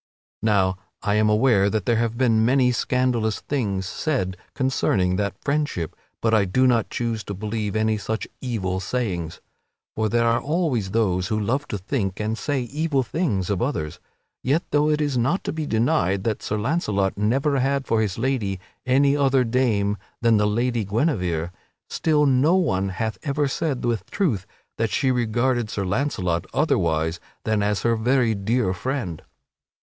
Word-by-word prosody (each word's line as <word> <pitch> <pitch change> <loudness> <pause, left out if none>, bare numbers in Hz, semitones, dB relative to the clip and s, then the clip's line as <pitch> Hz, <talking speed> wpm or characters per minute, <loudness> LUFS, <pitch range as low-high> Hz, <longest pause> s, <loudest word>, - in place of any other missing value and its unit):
Now 95 -4 +2 0.3
I 100 - +1
am 105 0 +3
aware 105 -2 +4
that 105 -3 -1
there 115 - +2
have 115 0 0
been 115 -4 +3
many 125 +1 +4
scandalous 120 -3 0
things 100 -9 -2
said 95 - -1 0.2
concerning 100 -9 +1
that 100 -1 -2
friendship, 140 - -1 0.3
but 115 -1 +2
I 110 -2 +5
do 130 +8 +2
not 120 -3 +2
choose 115 -2 -2
to 100 - -5
believe 105 +1 -3
any 110 0 +1
such 110 +2 -3
evil 95 -8 -2
sayings. 95 -6 -3 0.5
For 110 0 0
there 115 +2 +2
are 115 +1 +2
always 145 - 0
those 95 -4 +1
who 110 +2 0
love 130 +8 -1
to 105 - -3
think 95 -1 -2
and 110 +1 -1
say 135 +5 -1
evil 140 +2 0
things 110 - -1
of 95 - -1
others. 80 - -2 0.4
Yet 145 +7 +1
though 150 +1 +3
it 150 0 +1
is 145 -4 0
not 140 +11 +1
to - - -3
be 160 -2 -3
denied 110 - +1
that 110 -2 -1
Sir 105 - -2
Launcelot 105 - 0
never 135 +7 +1
had 135 +1 0
for 115 -2 +1
his 100 -4 -1
lady 115 -6 -1 0.3
any 140 +2 +4
other 135 -2 +3
dame 115 -4 +1 0.2
than 115 -2 +4
the 105 0 +2
Lady 120 +2 0
Guinevere, 95 - 0 0.4
still 150 -2 +2
no 140 +5 +4
one 100 - +1
hath 110 0 -3
ever 145 0 0
said 135 -2 -2
with 115 -6 -1
truth 120 - 0 0.3
that 115 -1 +1
she 130 +5 +1
regarded 120 0 +1
Sir 100 -2 -2
Launcelot 90 -6 -1
otherwise 85 - +1 0.2
than 110 -1 +1
as 105 0 0
her 115 -1 +3
very 120 +1 +2
dear 105 0 0
friend. 105 - -3
115 Hz, 170 wpm, -23 LUFS, 100-130 Hz, 0.5 s, I